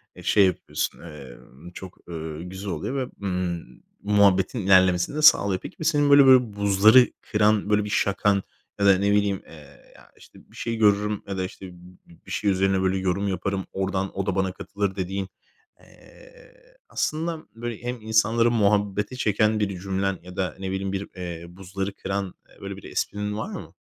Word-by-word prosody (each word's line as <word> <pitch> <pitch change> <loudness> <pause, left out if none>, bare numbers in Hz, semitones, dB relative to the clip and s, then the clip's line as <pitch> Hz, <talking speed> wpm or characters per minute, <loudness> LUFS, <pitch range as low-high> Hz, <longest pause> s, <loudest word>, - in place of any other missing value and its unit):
eee, - - -12
şey 100 - +4
yapıyorsun, 95 - -2
emm, 75 +1 -12
çok, 95 0 -10
eee, 80 -2 -6
güzel 95 +3 -7
oluyor 85 - -4
ve, 130 -2 -3
ımm, 90 -3 -4 0.2
muhabbetin 100 +2 +3
ilerlemesini 95 +2 +3
de 155 - -1
sağlıyor. 100 -11 +5
Peki, - - -10
bi 160 - -4
senin, 145 -3 +3
böyle 140 -1 +8
böyle, 130 -1 +8
bir 105 - -13
buzları 100 +5 +5
kıran, 105 -1 +1
böyle, 105 0 +3
bir 105 - -5
şakan 100 0 +1 0.4
ya 100 - +2
da 95 -1 +6
ne 100 +1 +1
bileyim, 100 -2 +1
eee, 75 -3 -16
ya, - - -19
işte, - - -17
bir - - -19
şey 115 -1 -3
görürüm 105 -1 +2
ya 95 -1 -4
da, 95 - -1
işte, 95 +1 -9
bi 90 -1 -18
bir - - -11
şey 105 - 0
üzerine 95 0 +1
böyle 95 0 +1
yorum 95 +2 -1
yaparım, 95 0 -2
oradan 95 0 -2
o 100 - -1
da 100 -2 -1
bana 95 -1 0
katılır, 100 +1 -4
dediğin, 95 0 -3 0.5
eee, - - -19 0.4
aslında, 160 +1 -2
böyle, 120 -1 -6
hem 120 -1 -4
insanları 110 +2 +2
muhabbete 105 0 +1
çeken 110 -2 +1
bir 100 -3 -2
cümlen 95 0 -2
ya 90 0 -11
da 95 -1 -2
ne 95 -1 -4
bileyim, 95 0 -3
bir, 100 +1 -4
eee, 85 -2 -6
buzları 95 +2 -5
kıran, 95 -1 -4 0.3
böyle, - - -6
bir - - -13
esprin 105 0 -3
var 110 - -4
mı? - - -8
100 Hz, 185 wpm, -24 LUFS, 95-105 Hz, 0.5 s, böyle